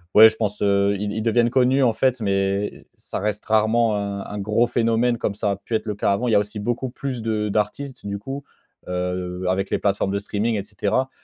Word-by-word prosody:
ouais 110 +1 +11
je 110 - -9
pense, 105 -2 -2
heu, 100 0 +3
ils 105 0 -2
ils 110 - -2
deviennent 120 +1 +3
connus 130 +2 +3
en 120 - +4
fait, 130 +1 +1
mais 100 0 0
ç - - -15
ça - - -6
reste 105 +1 -2
rarement 110 0 +3
un 100 -1 -3
un 105 - -6
gros 105 +4 +2
phénomène 115 +1 +1
comme 100 - -2
ça 105 0 0
a 100 - -1
pu 110 - -9
être 110 - -1
le 105 -2 -3
cas 100 - +1
avant. 120 +5 -1
Il - - +1
y - - +4
a - - +6
aussi 105 +1 -4
beaucoup 120 +4 -2
plus 130 -2 -5
de 110 -1 -1
d'artistes 110 +5 -2
du 100 0 -3
coup, 135 +6 -6 0.4
heu, 90 0 -3
avec 95 +1 0
les - - +1
plateformes 100 -1 0
de 100 - 0
streaming 105 +3 -1
et 100 - -2
cetera. 105 +5 -1
105 Hz, 240 wpm, -23 LUFS, 100-115 Hz, 0.4 s, ouais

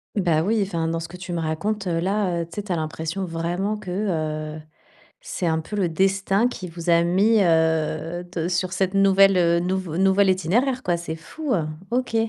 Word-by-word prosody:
Bah 170 -6 +2
oui, 215 +4 +1
enfin, 170 -4 -2
dans 165 0 -2
ce 165 - -7
que 180 - -9
tu 180 -1 -6
me 170 - -1
racontes 195 +6 -2
là, 180 +1 0
heu, - - -7
tu 170 - -24
sais, 205 - -3
tu 200 - -7
as 170 - +1
l'impression, 160 +4 -3
vraiment, 175 +5 -2
que, 190 -4 -7 0.6
heu, 155 - -8 0.6
c'est 345 - -4
un 160 -1 +1
peu 185 +6 -6
le 190 -4 +1
destin 195 +5 +2
qui 185 -8 -6
vous 170 +1 -5
a 170 0 +5
mis, 200 +5 +3
heu, 160 0 +1
te 170 -2 -2
sur 180 0 -1
cette 185 +1 0
nouvelle, 195 0 +5
heu, 170 -1 +3
nouveau 180 -2 -2
nouvel 195 +1 +4
itinéraire, 235 - +1
quoi. 175 -1 +1
C'est 165 -1 -5
fou, 275 - -4
heu, 165 -6 +1 0.3
OK 250 -2 -1
180 Hz, 205 wpm, -23 LUFS, 165-195 Hz, 0.6 s, a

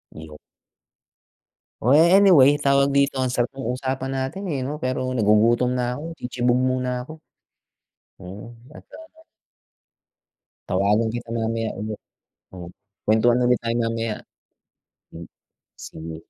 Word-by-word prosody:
Iyo 80 -1 -11 1.5
Oh, 135 +5 +5
anyway, 165 -5 +6
tawag 140 0 +2
dito, 140 -1 +2
ang 130 -1 -1
sarap 120 -1 0
ng 125 -2 -3
usapan 130 +1 -4
natin 135 +10 -4
eh, 135 - -2
'no? 145 +4 -4
Pero 130 -2 -3 0.2
nagugutom 115 +4 +3
na 125 0 -2
ako, 165 +3 -7
tsitsibog 125 -3 -1
muna 125 -1 -1
ako. 155 +5 -10 1.0
Mm, 95 +5 -10 0.2
at, - - -12 0.2
ah 320 0 -16 1.5
Tawagan 105 +4 +1
kita 120 -1 -7
mamaya 115 0 -2
ulit. 105 0 -5 0.6
Oh, 90 -2 -9 0.4
kwentuhan 120 +3 +3
ulit 125 0 +3
tayo 115 0 -2
mamaya. 115 -1 -2 0.9
Hmm. 85 0 -10 0.6
Sige, 80 0 -9
125 Hz, 120 wpm, -22 LUFS, 110-135 Hz, 1.5 s, anyway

